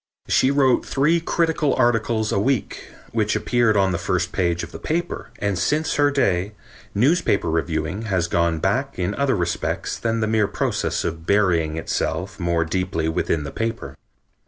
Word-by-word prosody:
She 130 - +3
wrote 135 -3 +3
three 150 +5 +2
critical 160 -3 +1
articles 115 -2 +1
a - - +1
week, 130 +3 -1 0.2
which 110 -2 0
appeared 120 -4 +2
on 95 -1 +3
the 85 - -1
first 90 0 -1
page 85 -3 0
of - - -8
the - - -8
paper, 175 +2 -3
and 100 -3 -1
since 155 +1 +1
her 145 0 +3
day 100 -8 0 0.4
newspaper 115 - +2
reviewing 80 +3 -1
has 90 -5 0
gone 85 -1 +1
back 130 - -1
in 90 +2 -1
other 140 0 +1
respects 85 -2 -2
than 115 0 -1
the 110 - +1
mere 110 -1 +2
process - - -1
of 80 0 -4
burying 85 -6 +2
itself 85 +4 -3
more 85 -2 +1
deeply 85 -2 -1
within 80 -1 -1
the 75 - -6
paper. 115 -12 -4
100 Hz, 165 wpm, -22 LUFS, 85-125 Hz, 0.4 s, She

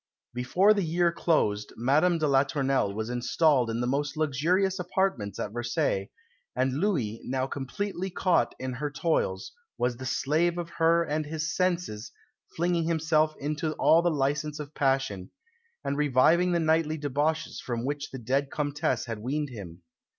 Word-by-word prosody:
Before 135 - +3
the 205 - 0
year 170 0 +2
closed 105 -12 0
Madame 150 +9 +3
de 155 -2 +1
la 135 -1 +5
Tournelle 135 -6 0
was 110 +3 -4
installed 125 +1 +2
in 115 +1 -2
the - - 0
most 140 +4 -1
luxurious 170 +6 +1
apartments 180 - -1
at 105 - -3
Versailles, 115 -4 -1 0.5
and 130 +1 +1
Louis, 135 - -1
now 130 0 -1
completely 175 +9 -4
caught 185 0 +1
in 130 -1 -4
her 145 +4 -3
toils, 145 - -1 0.3
was 120 -1 0
the 130 +1 -6
slave 165 +7 +1
of 170 -1 -4
her 165 +1 +4
and 155 -1 -2
his 155 +1 -3
senses, 175 - -1 0.4
flinging 170 0 +1
himself 160 -1 +1
into 150 +2 -2
all 165 +2 +4
the 175 - +2
licence 145 0 -1
of 150 0 -7
passion, 135 -10 0 0.5
and 140 - -2
reviving 150 +5 +4
the 170 - +2
nightly 160 -1 +1
debauches 150 +2 -1
from 120 -1 -3
which 145 +1 -3
the 130 - -7
dead 135 +4 -1
Comtesse 145 -4 -1
had 115 -3 -5
weaned 145 +6 -2
him. 90 -8 -10
145 Hz, 160 wpm, -28 LUFS, 125-165 Hz, 0.5 s, la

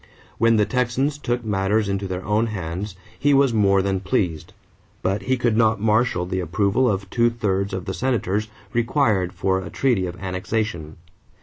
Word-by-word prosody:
When 115 0 +4
the 105 - +4
Texans 130 +4 0
took 120 -3 -2
matters 105 +1 +1
into 100 0 -2
their 90 0 -5
own 110 +2 +1
hands, 95 -1 -5 0.2
he 145 -1 +3
was 135 -3 +4
more 100 -3 +3
than 95 -1 0
pleased; 90 -4 -1 0.5
but 95 +2 0
he 130 +6 0
could 120 -2 +1
not 110 -1 +3
marshal 110 -3 +2
the 95 +1 -2
approval 100 +8 +1
of 100 -1 -2
two 120 -1 +3
thirds 100 -4 -1
of 95 -2 -4
the 95 - -3
Senators 110 -4 -1 0.3
required 115 -6 +1
for 95 +1 0
a 90 - -7
treaty 115 -7 +1
of 90 +1 -8
annexation. 95 -3 -3
105 Hz, 175 wpm, -22 LUFS, 95-115 Hz, 0.5 s, When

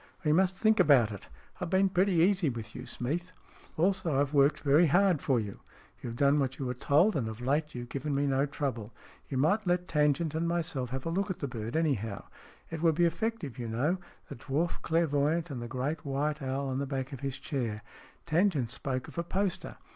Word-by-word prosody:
We 150 - +2
must 185 +2 +2
think 220 0 +3
about 125 -7 +5
it. 100 - -8
I - - -24
have 180 -3 -3
been 190 +2 +4
pretty 190 +1 +2
easy 175 0 +3
with 115 -3 -6
you, - - -8
Smeath." 170 +9 -3 0.2
" - - -25
Also, 175 -4 +1
I've 145 +1 0
worked 140 +1 +4
very 150 +4 +5
hard 180 0 +3
for 130 -3 +2
you." 105 -3 -5 0.2
" - - -28
You've 115 -2 -5
done 140 +3 +3
what 135 -1 -1
you 135 - -4
were 125 - -1
told, 150 - +3
and 125 -6 0
of 110 0 -6
late 145 +4 -1
you've 120 0 -6
given 140 +2 -3
me 140 +1 +1
no 135 +1 +1
trouble. 130 -7 -3 0.4
You 135 - -2
might 180 +10 +2
let 180 0 +1
Tangent 150 +1 +1
and 165 +2 -1
myself 165 -7 -2
have 130 +1 -4
a 165 - -1
look 190 +3 -1
at 185 - -2
the 140 - -3
bird, 115 -1 -5
anyhow. 120 - 0 0.5
It 160 -1 -4
would 165 -2 +3
be 175 +2 +4
effective, 170 - -2
you 120 - -3
know 140 +11 0 0.3
the - - -8
dwarf 145 +8 -2
clairvoyant 160 0 +1
and 125 -3 -5
the 120 - -5
great 135 +6 -3
white 150 +2 -1
owl 135 +1 -2
on 130 0 -2
the 140 - -2
back 135 0 -3
of 135 - -6
his 135 -1 -3
chair. 115 -6 -3 0.4
Tangent 155 - +1
spoke 130 +3 -3
of - - -6
a - - 0
poster. 190 +2 -2
145 Hz, 220 wpm, -30 LUFS, 130-170 Hz, 0.5 s, about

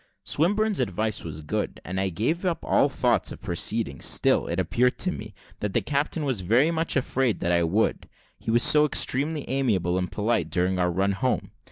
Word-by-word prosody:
Swinburne's 205 +4 +1
advice 110 -2 -1
was 80 -2 -7
good, 75 - -3
and 95 +2 -3
I 95 - 0
gave 120 - -1
up 180 -3 -2
all 140 - +3
thoughts 125 -3 +1
of - - -8
proceeding; 105 +4 -2
still, - - +2
it 85 +2 -2
appeared 120 +8 +1
to 185 - +1
me, 105 - -8 0.2
that 105 -2 -3
the - - +3
captain 145 +2 -1
was 130 -8 -1
very 120 - +3
much 165 0 -1
afraid 130 -3 0
that 85 - 0
I 85 0 +3
would, 90 +7 0 0.3
he - - -7
was 120 +1 +3
so 150 0 +6
extremely 150 +1 0
amiable 100 -10 0
and 90 - -3
polite 110 +2 0
during 90 +1 0
our 90 0 +2
run 95 +3 +1
home. 125 +6 -1
115 Hz, 195 wpm, -25 LUFS, 95-140 Hz, 0.3 s, so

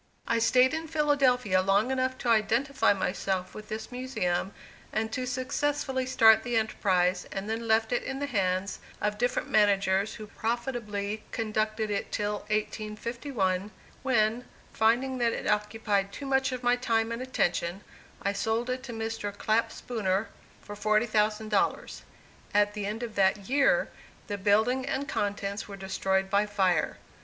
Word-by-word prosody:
I 230 0 +2
stayed 255 +3 +4
in 320 0 -3
Philadelphia 270 -10 +2
long 200 +6 +2
enough 260 0 0
to - - +2
identify 235 +5 +3
myself 190 -1 -1
with 215 +1 -10
this 220 +3 -5
Museum 200 -8 -2 0.4
and 220 +1 -1
to 255 +2 -3
successfully 260 +1 -1
start 225 -4 +6
the 240 -2 -1
enterprise 185 -4 +1
and 195 +1 -4
then 225 +1 -3
left 220 +1 +2
it 245 - +1
in 270 - -4
the 285 - -2
hands 190 -6 -1 0.2
of 210 0 -1
different 245 +1 0
managers 200 -1 +3
who 215 - -8
profitably 215 -2 -3
conducted 215 -1 -1
it 200 - -2
till 210 0 -1
1851, 215 -1 -2 0.3
when, 235 -2 +1 0.3
finding 250 +4 +2
that 235 -1 +2
it - - -4
occupied 210 -1 0
too 280 - -7
much 270 0 +1
of 255 -1 -5
my 245 0 +4
time 230 -2 0
and 230 +1 -3
attention, 190 -7 -1 0.4
I 200 - +1
sold 225 +4 -1
it 255 0 -3
to 240 - -6
Mr. 225 -2 -3
Clapp 220 +2 +1
Spooner 210 -3 -2 0.3
for 205 - -8
$40,000. 215 0 +1 0.5
At 205 0 +4
the 205 -1 -3
end 220 +3 -4
of 230 -2 -5
that 195 0 +2
year, 290 - +3 0.4
the 205 -2 -4
building 220 +6 +3
and 275 +1 -2
contents 205 -2 -2
were 200 -1 -8
destroyed 190 0 -1
by 205 +1 +3
fire. 185 -6 +1
220 Hz, 150 wpm, -28 LUFS, 200-245 Hz, 0.5 s, start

